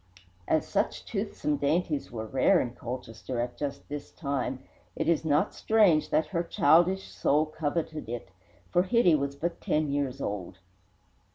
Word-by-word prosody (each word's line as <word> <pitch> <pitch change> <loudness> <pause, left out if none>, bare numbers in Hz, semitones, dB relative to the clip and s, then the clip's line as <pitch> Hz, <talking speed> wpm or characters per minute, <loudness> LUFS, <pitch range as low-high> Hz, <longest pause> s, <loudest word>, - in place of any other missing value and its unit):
As - - +1
such - - -1
toothsome 150 -1 -2
dainties 150 0 0
were 110 -2 -4
rare 135 - +3
in 120 - -1
Colchester 120 0 -6
at 120 +1 -2
just 145 -2 -5
this 145 0 -6
time, 135 -3 -3 0.3
it - - -2
is 165 -2 +2
not 150 -1 +2
strange 205 -9 +3
that 155 +1 +2
her 170 -3 -1
childish 175 +3 +3
soul 150 +2 +2
coveted 155 -2 -3
it, 120 -5 -5 0.4
for 175 - +4
Hitty 190 -2 +4
was 140 -2 0
but 170 +4 -3
ten 150 -1 0
years 140 -2 -1
old. 95 -7 -4
145 Hz, 155 wpm, -28 LUFS, 130-165 Hz, 0.4 s, for